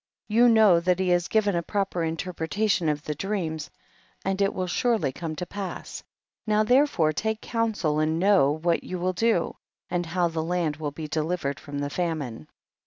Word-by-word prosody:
3. 210 Hz, -, -3 dB
You 240 Hz, +1 st, +7 dB
know 215 Hz, -6 st, +6 dB
that 180 Hz, +1 st, +1 dB
he 185 Hz, -1 st, 0 dB
has 175 Hz, -1 st, +2 dB
given 205 Hz, -3 st, +2 dB
a 170 Hz, -, +1 dB
proper 195 Hz, -1 st, -1 dB
interpretation 170 Hz, +2 st, -1 dB
of 150 Hz, -1 st, -2 dB
the 150 Hz, -, -3 dB
dream, 170 Hz, -1 st, -2 dB, 0.7 s
and 195 Hz, +1 st, 0 dB
it 195 Hz, 0 st, +3 dB
will 185 Hz, -, -2 dB
surely 220 Hz, -, +1 dB
come 155 Hz, +3 st, -5 dB
to 180 Hz, -, -4 dB
pass, 190 Hz, -1 st, -6 dB, 0.5 s
now 215 Hz, 0 st, +3 dB
therefore 245 Hz, -, +3 dB
take 220 Hz, +6 st, -1 dB
counsel 220 Hz, -12 st, -1 dB
and 155 Hz, +1 st, +1 dB
know 185 Hz, -6 st, +4 dB
what 165 Hz, +2 st, 0 dB
you 185 Hz, -, -5 dB
will 185 Hz, +1 st, -1 dB
do 225 Hz, -3 st, +1 dB, 0.3 s
and 175 Hz, -1 st, -1 dB
how 175 Hz, +1 st, +1 dB
ihe 165 Hz, -, -8 dB
land 160 Hz, -2 st, -1 dB
will 155 Hz, -2 st, -3 dB
be 155 Hz, +2 st, -7 dB
delivered 155 Hz, -2 st, -2 dB
from 145 Hz, -1 st, -7 dB
the 145 Hz, 0 st, -3 dB
famine. 150 Hz, -, -3 dB
175 Hz, 185 wpm, -26 LUFS, 160-200 Hz, 0.7 s, You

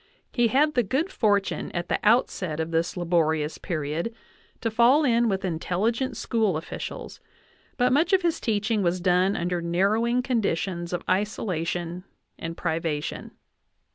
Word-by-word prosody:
He 240 Hz, -2 st, +3 dB
had 290 Hz, +6 st, +3 dB
the 245 Hz, -, +3 dB
good 270 Hz, -, -1 dB
fortune 205 Hz, -, 0 dB
at 175 Hz, 0 st, -3 dB
the -, -, 0 dB
outset 200 Hz, -8 st, +2 dB
of 160 Hz, +1 st, -2 dB
this 165 Hz, +2 st, 0 dB
laborious 160 Hz, -3 st, +1 dB
period 160 Hz, +5 st, -3 dB, 0.5 s
to 225 Hz, -, -1 dB
fall 240 Hz, +7 st, +5 dB
in 235 Hz, -3 st, +3 dB
with 195 Hz, -1 st, -1 dB
intelligent 190 Hz, +9 st, -1 dB
school 220 Hz, -8 st, +1 dB
officials, 160 Hz, -, -7 dB, 0.6 s
but 250 Hz, 0 st, +3 dB
much 315 Hz, +8 st, +3 dB
of 380 Hz, -1 st, +4 dB
his 340 Hz, -2 st, +1 dB
teaching 215 Hz, 0 st, 0 dB
was 180 Hz, 0 st, +1 dB
done 180 Hz, +2 st, +2 dB
under 175 Hz, 0 st, -1 dB
narrowing 215 Hz, +8 st, +1 dB
conditions 190 Hz, -8 st, -1 dB
of 175 Hz, -1 st, -3 dB
isolation 180 Hz, -3 st, -1 dB, 0.4 s
and 165 Hz, 0 st, -5 dB
privation. 160 Hz, -3 st, -2 dB
190 Hz, 140 wpm, -26 LUFS, 170-235 Hz, 0.6 s, fall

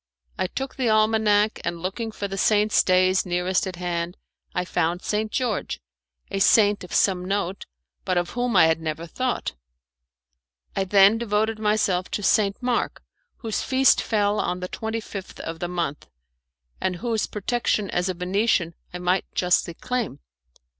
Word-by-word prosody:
I 185 Hz, -, -1 dB
took 270 Hz, +7 st, -5 dB
the 255 Hz, -3 st, +1 dB
almanac 215 Hz, -1 st, +3 dB
and 170 Hz, 0 st, -3 dB
looking 200 Hz, +6 st, -4 dB
for 205 Hz, -1 st, -4 dB
the 195 Hz, -, -5 dB
saints' 210 Hz, +2 st, +3 dB
days 185 Hz, 0 st, +3 dB
nearest 180 Hz, +2 st, 0 dB
at 185 Hz, -, -5 dB
hand 175 Hz, 0 st, -3 dB, 0.4 s
I 180 Hz, -, 0 dB
found 175 Hz, 0 st, -1 dB
St. 215 Hz, 0 st, -1 dB
George 245 Hz, -5 st, -2 dB, 0.5 s
a 195 Hz, -, -1 dB
saint 205 Hz, 0 st, +4 dB
of 180 Hz, -, -10 dB
some 185 Hz, -2 st, +2 dB
note, 195 Hz, 0 st, -2 dB, 0.4 s
but 185 Hz, -1 st, 0 dB
of 175 Hz, 0 st, 0 dB
whom 245 Hz, -2 st, -1 dB
I 180 Hz, -, +7 dB
had 160 Hz, 0 st, +2 dB
never 160 Hz, +1 st, -4 dB
thought. 255 Hz, +8 st, -2 dB, 1.2 s
I 195 Hz, -, 0 dB
then 200 Hz, +3 st, +5 dB
devoted 220 Hz, -1 st, 0 dB
myself 210 Hz, -4 st, +1 dB
to 205 Hz, -, -8 dB
St. 200 Hz, +3 st, +2 dB
Mark, 245 Hz, -1 st, -1 dB, 0.3 s
whose 225 Hz, -4 st, -3 dB
feast 265 Hz, 0 st, +4 dB
fell 210 Hz, -1 st, +1 dB
on 180 Hz, -, -1 dB
the 180 Hz, -, -4 dB
twenty 220 Hz, +3 st, -4 dB
fifth 195 Hz, -3 st, -8 dB
of 165 Hz, 0 st, -6 dB
the 175 Hz, -, -2 dB
month, 170 Hz, -5 st, -3 dB, 0.7 s
and 185 Hz, -1 st, 0 dB
whose 225 Hz, +3 st, -1 dB
protection 215 Hz, -1 st, -1 dB
as 180 Hz, +2 st, 0 dB
a 185 Hz, -, -2 dB
Venetian 180 Hz, -1 st, +1 dB, 0.2 s
I 180 Hz, -, -5 dB
might 180 Hz, +1 st, +1 dB
justly 180 Hz, -1 st, +1 dB
claim. 250 Hz, +1 st, -3 dB
195 Hz, 160 wpm, -24 LUFS, 180-220 Hz, 1.2 s, I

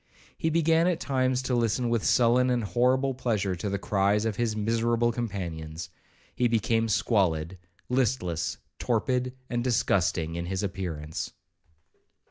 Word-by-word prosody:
He 160 Hz, -, -1 dB
began 165 Hz, +1 st, +3 dB
at 180 Hz, -3 st, +1 dB
times 130 Hz, -1 st, 0 dB
to 130 Hz, -, -1 dB
listen 120 Hz, +1 st, +1 dB
with 115 Hz, -2 st, 0 dB
sullen 125 Hz, +1 st, +4 dB
and 120 Hz, -2 st, +1 dB
horrible 125 Hz, +7 st, +2 dB
pleasure 110 Hz, -7 st, -1 dB
to 100 Hz, +4 st, -3 dB
the 100 Hz, -, -1 dB
cries 100 Hz, +1 st, +1 dB
of 110 Hz, -2 st, -1 dB
his 115 Hz, -1 st, -1 dB
miserable 115 Hz, +2 st, +1 dB
companions. 85 Hz, -8 st, -5 dB, 0.4 s
He 125 Hz, -, +2 dB
became 115 Hz, 0 st, +1 dB
squalid, 95 Hz, -5 st, +1 dB, 0.3 s
listless, 115 Hz, -10 st, 0 dB, 0.2 s
torpid, 125 Hz, +2 st, 0 dB
and 120 Hz, -2 st, -2 dB
disgusting 90 Hz, -9 st, +1 dB
in 85 Hz, +1 st, -4 dB
his 95 Hz, +2 st, -2 dB
appearance. 85 Hz, -6 st, -4 dB
115 Hz, 135 wpm, -27 LUFS, 95-125 Hz, 0.4 s, sullen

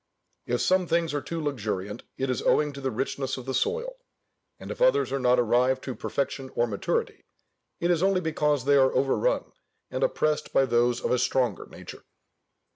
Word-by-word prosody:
If 120 Hz, 0 st, 0 dB
some 185 Hz, -1 st, +2 dB
things 165 Hz, -1 st, +1 dB
are 145 Hz, -, -1 dB
too 165 Hz, +3 st, -5 dB
luxuriant 105 Hz, -8 st, -3 dB, 0.2 s
it 135 Hz, 0 st, -1 dB
is 125 Hz, -, -2 dB
owing 150 Hz, -1 st, +2 dB
to 140 Hz, -, -8 dB
the 135 Hz, -, -1 dB
richness 135 Hz, +3 st, -3 dB
of 130 Hz, -, -8 dB
the 135 Hz, -, -3 dB
soil; 475 Hz, -, -1 dB, 0.6 s
and -, -, -8 dB
if -, -, -7 dB
others -, -, +3 dB
are 140 Hz, -, -1 dB
not 125 Hz, -1 st, +3 dB
arrived 125 Hz, +3 st, +2 dB
to 130 Hz, -, -4 dB
perfection 135 Hz, +3 st, -3 dB
or 120 Hz, -, +3 dB
maturity, 105 Hz, -4 st, -2 dB, 0.6 s
it 170 Hz, +1 st, +1 dB
is 170 Hz, -2 st, +1 dB
only 190 Hz, 0 st, +3 dB
because 150 Hz, -5 st, 0 dB
they 140 Hz, 0 st, +5 dB
are 130 Hz, -1 st, +5 dB
overrun 140 Hz, -, +1 dB, 0.4 s
and -, -, -2 dB
oppressed 155 Hz, -, 0 dB
by 135 Hz, -, +4 dB
those 120 Hz, -1 st, +2 dB
of -, -, 0 dB
a 125 Hz, -, +2 dB
stronger 125 Hz, -5 st, 0 dB
nature. -, -, -11 dB
135 Hz, 190 wpm, -26 LUFS, 125-160 Hz, 0.6 s, they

